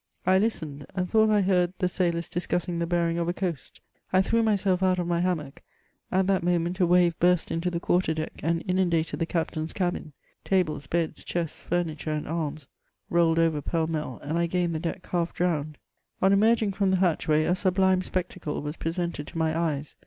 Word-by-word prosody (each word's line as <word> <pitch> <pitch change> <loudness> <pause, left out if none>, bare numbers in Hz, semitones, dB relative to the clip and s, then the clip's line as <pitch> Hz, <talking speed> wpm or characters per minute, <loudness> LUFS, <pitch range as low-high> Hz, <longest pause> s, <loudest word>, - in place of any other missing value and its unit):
I 185 +1 +5
Ibtened, 155 -10 -2
and 180 -1 -1
thought 220 +2 +4
I 210 -1 +4
heard 180 -2 +2
the 180 - +1
sailors 175 -2 -1
db 175 - -4
cussing 175 -1 -1
the 170 - -1
bearing 170 -1 +1
of 170 - -1
a - - 0
coast; 175 -7 -4 0.3
I 185 0 +4
threw 230 +4 +2
myself 200 -4 +1
out 185 -1 +3
of 175 - -1
my 170 0 0
hammock; 165 -6 -2 0.5
at 190 +1 +2
that 190 -1 +2
moment 175 +1 0
a 180 - +4
wave 175 -1 +3
biurst 180 -1 +2
into 165 +2 -1
the 170 -1 -2
quarter 175 -2 +1
deck 155 0 -4
and 165 +2 0
inundated 175 -3 +1
the 165 - 0
captain's 160 -2 -2
cabin; 175 -5 -2 0.3
tables, 155 -7 0
beds, 165 0 -1
diests, 170 -3 -3
furniture, 165 -3 -2
and 150 - -3
arras, 155 -3 -3 0.4
rolled 170 -1 +3
over 165 -3 +2
pell 165 +2 0
mell, 155 -6 -4
and 160 +4 -1
I 170 - +2
gained 175 0 0
the 160 - -2
deck 175 +3 -4
half 170 -1 -1
drowned. 155 -4 -1 0.4
On 190 +1 +4
emerging 215 0 +3
from 195 0 +1
the 190 - +3
hatchway, 160 -4 +2
a 175 - +2
sublime 185 0 +2
spectacle 180 -4 -3
was 150 +2 -5
pre 165 - -2
sented 170 -3 -3
to - - -8
my 160 -1 +1
eyes. 155 -3 -2
175 Hz, 205 wpm, -26 LUFS, 160-185 Hz, 0.5 s, I